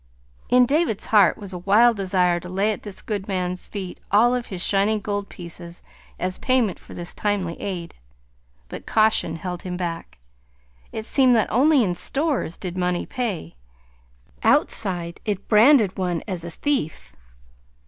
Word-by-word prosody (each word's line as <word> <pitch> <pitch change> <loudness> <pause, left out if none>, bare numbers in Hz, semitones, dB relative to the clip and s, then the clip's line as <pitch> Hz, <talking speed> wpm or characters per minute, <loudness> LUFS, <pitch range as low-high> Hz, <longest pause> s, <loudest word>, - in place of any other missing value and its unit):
In 250 0 +6
David's 290 - 0
heart 205 -5 +4
was 200 -2 -7
a 180 - -5
wild 215 +6 +4
desire 185 -3 +1
to 180 - -10
lay 195 +4 +1
at 210 - -6
his 205 -3 -9
good 205 -3 -4
man's 180 -2 -2
feet 190 -3 -6
all 230 +5 +4
of 250 -1 -2
his 185 -2 -4
shining 205 +2 +2
gold 205 -1 -3
pieces 170 -1 -10 0.3
as 185 +1 -3
payment 250 -7 +1
for - - -13
this 175 0 -5
timely 200 -5 -1
aid. 180 -4 -5 0.7
But - - -9
caution 215 -7 +2
held 180 +1 -5
him 180 -1 -5
back: 170 -2 -5 0.7
it 220 - -5
seemed 255 0 +4
that 220 - +1
only 275 +2 +4
in 180 -4 0
stores 275 - -1
did 180 -2 -6
money 180 -1 -1
pay; 205 - -4 0.9
outside 175 -5 +1
it 205 -3 -3
branded 220 -2 +5
one 180 -3 -1
as 180 -4 -2
a 170 - -5
thief! 215 - -2
195 Hz, 160 wpm, -23 LUFS, 180-220 Hz, 0.9 s, In